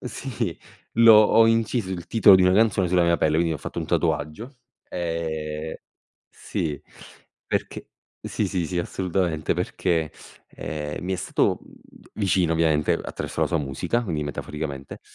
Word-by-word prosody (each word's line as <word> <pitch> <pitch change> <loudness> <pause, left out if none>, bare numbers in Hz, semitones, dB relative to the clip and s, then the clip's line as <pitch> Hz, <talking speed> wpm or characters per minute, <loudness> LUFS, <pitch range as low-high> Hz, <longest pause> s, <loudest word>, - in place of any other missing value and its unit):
sì, 120 -7 -4 0.4
l'ho 115 -1 +8
ho 110 +1 +6
inciso 115 -2 +1
il 85 -2 -5
titolo 100 -4 +7
di 95 - +3
una 90 - +4
canzone 100 -4 +3
sulla 90 0 +3
mia 85 0 +3
pelle, 80 -1 +1
quindi 85 0 +1
ho - - -2
fatto - - -6
un - - -4
tatuaggio. 105 - -2 0.3
Ehm, 80 -2 -4 0.5
sì, 75 -4 -4 0.7
perché - - -3 0.3
sì, 105 - -2
sì, 90 -2 -1
sì 90 +1 -3
assolutamente 85 -3 -1
perché, 85 -2 -1 0.4
ehm, 75 0 -5
mi 95 - -2
è 95 - 0
stato, - - 0
mhmm, - - -18 0.4
vicino 95 -5 +1
ovviamente 80 -2 +2
attraverso - - -5
la - - +2
sua 85 - 0
musica, 75 - -2
quindi 80 -7 -2
metaforicamente, 75 -1 -6
85 Hz, 150 wpm, -24 LUFS, 80-100 Hz, 0.7 s, l'ho